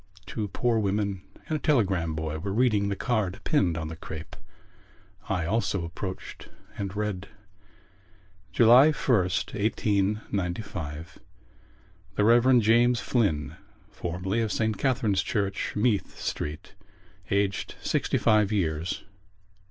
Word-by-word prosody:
Two 105 -2 -3
poor 115 +4 0
women 100 -2 -1 0.3
and 155 - 0
a - - -10
telegram 95 - +1
boy 80 0 -3
were 100 +4 -4
reading 110 -5 +2
the 100 - -1
card 110 -5 -1
pinned 95 - +2
on 80 -1 -3
the 80 - -6
crape. 80 0 -8 0.9
I 90 -4 0
also 100 -2 0
approached 95 +3 -7 0.3
and 100 -1 -4
read: 105 -2 -3 1.2
July 120 +4 +7
1st, 95 -10 +1
1895 100 -6 -2 1.0
The 105 - +2
Rev. 120 +3 +6
James 120 +2 +4
Flynn 80 - 0 0.3
(formerly 95 +3 -2
of 110 - 0
S. 110 -1 +2
Catherine's 110 -6 +1
Church, 100 0 -2
Meath 105 -1 0
Street), 75 +4 -5 0.6
aged 100 0 0
sixty - - 0
five 110 -2 +3
years. 85 -5 -1
100 Hz, 115 wpm, -27 LUFS, 90-110 Hz, 1.2 s, July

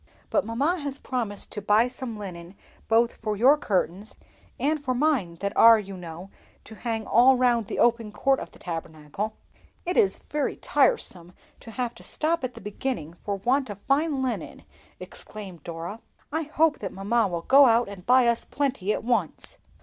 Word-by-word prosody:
"But 300 - +2
mamma 285 +11 0
has 280 -2 -4
promised 230 -8 -4
to 210 - -5
buy 210 +4 +4
some 250 -3 -6
linen 180 -2 -8 0.3
both 230 +1 +2
for 215 -2 -3
your 260 +7 +6
curtains 200 - -2 0.4
and 300 +1 0
for 255 -2 -1
mine 250 - +1
that 200 +1 -2
are, 230 0 +8
you 195 -2 -6
know, 175 +1 -9 0.3
to 220 - -12
hang 225 -1 -3
all 250 +4 +6
round 240 -4 +2
the - - -4
open 230 -2 +2
court 270 +5 +1
of - - -7
the - - -18
Tabernacle." 165 +4 -5 0.5
"It 355 +1 -1
is 195 - +3
very 295 -1 -1
tiresome 180 - 0 0.3
to - - -12
have 240 +1 -3
to - - -15
stop 325 +1 -1
at 250 -1 -4
the 230 - -10
beginning 210 - -4
for 205 - -2
want 255 +6 0
of 205 - -6
fine 280 +1 +1
linen!" 255 - -4 0.4
exclaimed 190 -7 -10
Dora. 170 +6 -6 0.3
"I 320 +1 -1
hope 315 -1 +2
that 195 - -5
mamma 210 +3 +1
will 170 -2 -4
go 275 +5 +7
out 235 +1 +3
and 200 -3 -9
buy 250 +4 +5
us 235 0 +1
plenty 270 -8 -1
at - - -2
once." 225 -9 -2
230 Hz, 180 wpm, -26 LUFS, 195-265 Hz, 0.5 s, are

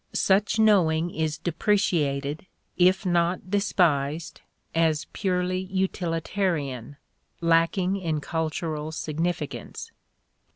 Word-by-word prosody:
Such 200 +2 +2
knowing 175 -6 +3
is 155 -2 -2
depreciated, 155 -5 0 0.3
if 185 +3 +3
not 175 +1 0
despised, 165 -7 +1 0.3
as 160 -2 +1
purely 185 -2 0
utilitarian, 170 - -2 0.4
lacking 170 +3 +2
in 165 -5 -2
cultural 155 0 -3
significance. 160 0 -4
170 Hz, 80 wpm, -26 LUFS, 155-185 Hz, 0.4 s, knowing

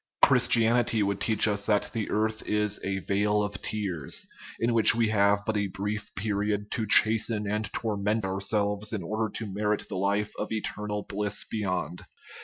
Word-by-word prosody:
Christianity 120 -3 +4
would 100 0 -2
teach 110 -1 +4
us 100 -1 -1
that 105 -2 +1
the 110 -2 -3
earth 110 +1 -1
is 105 -1 0
"a 95 0 -2
vale 105 +2 +1
of 105 0 -5
tears/' 95 -10 -2 0.3
in 115 +1 +1
which 115 0 +6
we 115 -2 +1
have 100 -1 +2
but 110 - -1
a 105 -1 0
brief 105 +2 -5
period 105 0 -2
to 110 -2 -1
chasten 110 0 +3
and 105 0 -2
torment 105 -1 -1
ourselves 100 +2 -1
in 100 -5 -3
order 110 +4 -2
to 105 -4 -4
merit 105 +1 -1
the 95 - -4
life 100 +2 -1
of 105 - -4
eternal 105 -1 -3
bliss 105 +1 0
beyond. 90 -4 -3
105 Hz, 170 wpm, -27 LUFS, 100-110 Hz, 0.3 s, which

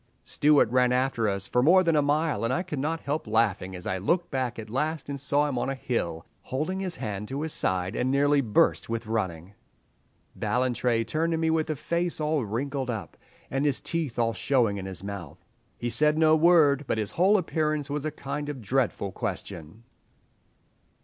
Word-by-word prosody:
"Stewart 150 -3 +3
ran 125 -1 +3
after 125 -3 +1
us 100 -1 -2
for 125 - +2
more 180 +7 +6
than 165 -2 +2
a 150 - +4
mile, 145 -5 0
and 115 - 0
I 175 +7 0
could 160 -6 -5
not 160 +4 -2
help 145 -2 -3
laughing 105 -4 +1
as 90 - -8
I 95 - -2
looked 170 - 0
back 130 -3 -2
at 110 -1 -7
last 150 +6 -2
and 140 -1 -4
saw 145 +2 +1
him 130 -4 -2
on 130 - -1
a 135 - -2
hill, 85 -11 -3 0.2
holding 155 +9 -3
his 185 -3 -2
hand 105 -4 -5
to 140 +5 -4
his 160 - -2
side, 95 +3 -1
and 130 - 0
nearly 140 +1 +3
burst 110 -2 +2
with 115 0 -3
running. 95 -5 -3 0.8
"Ballantrae 125 -2 0
turned 165 +7 -1
to - - 0
me 160 0 +1
with 160 -1 0
a 155 - 0
face 170 +4 -1
all 150 -2 0
wrinkled 130 +5 -3
up, 110 -4 -5 0.4
and 135 +2 0
his 145 -3 +2
teeth 160 -7 -3
all 115 -1 +1
showing 120 -7 +1
in 95 - -6
his 95 -1 -6
mouth…. 90 -4 -8 0.3
He 120 0 -3
said 150 +3 +3
no 155 0 +5
word, 155 -4 +4
but - - 0
his 105 -1 -2
whole 195 +5 +4
appearance 155 -5 -1
was 145 0 -3
a 155 - -1
kind 145 0 -5
of 145 -3 -5
dreadful 115 -3 -1
question. 85 +3 -6
135 Hz, 200 wpm, -27 LUFS, 110-155 Hz, 0.8 s, more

